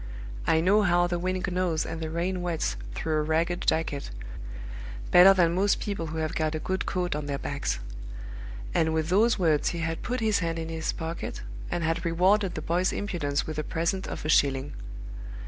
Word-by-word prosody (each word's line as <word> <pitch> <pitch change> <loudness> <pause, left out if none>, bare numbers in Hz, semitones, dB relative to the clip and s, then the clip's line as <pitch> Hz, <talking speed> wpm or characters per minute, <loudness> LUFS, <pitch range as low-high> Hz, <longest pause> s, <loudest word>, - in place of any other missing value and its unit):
I 160 - +4
know 200 +5 +5
how 175 -3 +4
the 175 0 -1
wind 185 +1 -1
gnaws 180 -3 0
and 165 0 -5
the 160 - -2
rain 175 +3 -1
wets 175 -2 -1 0.2
through 155 -1 0
a - - +2
ragged 165 +3 0
jacket, 155 -3 +1 1.0
better 180 +2 +9
than 175 -3 +4
most 195 +3 +2
people 200 -6 -3
who 160 +1 -5
have 155 -1 -1
got 155 0 0
a - - -1
good 190 +3 -2
coat 180 -4 0
on 150 -1 -3
their 140 -1 -1
backs." 140 - -2 1.0
And 160 0 +2
with 160 0 0
those 220 +6 +4
words 160 -6 +3
he 170 - -3
had 165 0 -2
put 250 +1 -2
his 220 -2 +2
hand 165 -2 -1
in 165 0 -4
his 160 -1 -1
pocket, 165 - -5 0.3
and 170 - -1
had 165 +1 0
rewarded 185 +3 +3
the 155 - -4
boy's 180 +3 +1
impudence 150 -8 -1
with 155 -1 -4
a - - -1
present 170 +5 -1
of - - -5
a - - -1
shilling. 140 -1 +3
165 Hz, 200 wpm, -28 LUFS, 160-185 Hz, 1.0 s, better